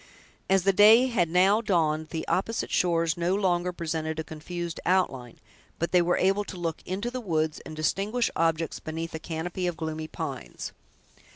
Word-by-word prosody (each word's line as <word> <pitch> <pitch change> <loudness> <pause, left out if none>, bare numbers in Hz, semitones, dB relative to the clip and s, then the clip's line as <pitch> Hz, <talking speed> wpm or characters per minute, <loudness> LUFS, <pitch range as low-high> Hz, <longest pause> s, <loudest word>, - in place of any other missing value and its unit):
As 190 -1 +4
the 195 +1 +3
day 215 +5 +7
had 180 -9 +1
now 190 +5 +4
dawned, 160 -6 +1
the 160 -1 -4
opposite 225 +5 -1
shores 165 -2 +2
no 175 +2 +1
longer 180 -3 +1
presented 160 -2 -3
a 160 - -2
confused 170 +2 -6
outline, 135 -10 0 0.4
but 170 - -2
they 180 - +5
were 175 +1 +2
able 195 +2 +2
to 185 - -8
look 165 -2 -3
into 200 +6 -2
the 255 0 -4
woods, 160 -6 -1
and 155 - -8
distinguish 200 +9 0
objects 165 0 0
beneath 165 +1 -5
a 160 - -4
canopy 170 +3 -3
of 175 -2 -3
gloomy 160 -1 -4
pines. - - -6
175 Hz, 175 wpm, -27 LUFS, 160-190 Hz, 0.4 s, day